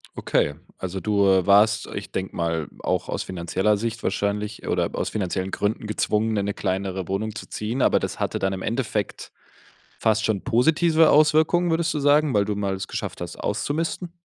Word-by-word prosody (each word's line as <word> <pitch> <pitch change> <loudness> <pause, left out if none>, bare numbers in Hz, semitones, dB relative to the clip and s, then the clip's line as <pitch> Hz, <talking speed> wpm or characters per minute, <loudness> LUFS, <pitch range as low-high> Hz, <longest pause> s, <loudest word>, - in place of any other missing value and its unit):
Okay, 75 - +1 0.2
also 95 +1 -4
du, 100 -1 +2
äh, 95 -1 +3
warst, 105 +2 +4
ich - - -6
denke 95 0 -4
mal, 85 -2 -1
auch - - -1
aus - - -2
finanzieller 95 +4 0
Sicht 115 +1 -4
wahrscheinlich 105 +1 -2
oder - - 0
aus - - -2
finanziellen 95 -2 -2
Gründen 105 +2 -2
gezwungen, 105 +1 0
in 100 - 0
'ne 100 - -1
kleinere 95 -2 -2
Wohnung 105 +3 -2
zu 110 - -9
ziehen, 115 +5 -3
aber - - +4
das - - -4
hatte - - -1
dann 95 0 0
im 95 - -5
Endeffekt 110 -4 -3 0.7
fast 110 0 +2
schon 110 -3 +1
positive 160 +6 +4
Auswirkungen, 155 +4 +4
würdest 165 +1 +1
du - - -2
sagen, 145 +1 +4
weil 100 -3 +2
du 105 -1 -2
mal 100 -1 -1
es 95 - -5
geschafft - - -5
hast - - -6
auszumisten? 165 +3 -2
105 Hz, 185 wpm, -24 LUFS, 95-130 Hz, 0.7 s, warst